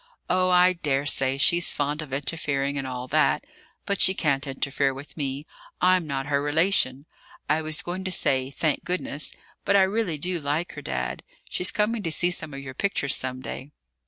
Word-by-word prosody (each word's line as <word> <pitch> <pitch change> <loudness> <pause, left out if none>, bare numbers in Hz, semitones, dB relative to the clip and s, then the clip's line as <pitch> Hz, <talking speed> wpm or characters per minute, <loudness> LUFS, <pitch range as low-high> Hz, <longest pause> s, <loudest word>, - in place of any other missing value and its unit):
"Oh, 185 0 +3
I 180 0 +5
daresay 140 -4 +1
she's 170 +5 +3
fond 145 +1 -1
of 150 -3 -8
interfering 140 0 -1
and 135 -1 -2
all 125 0 -5
that; - - +2 0.4
but 200 -1 0
she 190 - +6
can't 140 -5 0
interfere 135 0 -1
with 140 +2 -10
me; 140 -1 -3 0.3
I'm 180 -2 +3
not 135 -2 -2
her 140 0 +1
relation 145 -3 +2 0.4
I 150 +2 +2
was 155 0 -1
going 180 +2 -4
to 185 - -1
say 130 -6 +2
'Thank 145 +1 -1
goodness,' 175 -4 -3 0.3
but 200 - +2
I 195 - +7
really 190 -4 0
do 175 +3 0
like 150 +4 -1
her, - - -8
Dad. 65 -1 -3 0.3
She's 180 - +2
coming 215 +2 +1
to 165 - -2
see 175 +3 +2
some 155 -3 -3
of 140 0 -7
your 130 -1 -8
pictures 150 -6 0
some 130 0 -1
day." 130 - -7
145 Hz, 190 wpm, -25 LUFS, 135-180 Hz, 0.4 s, I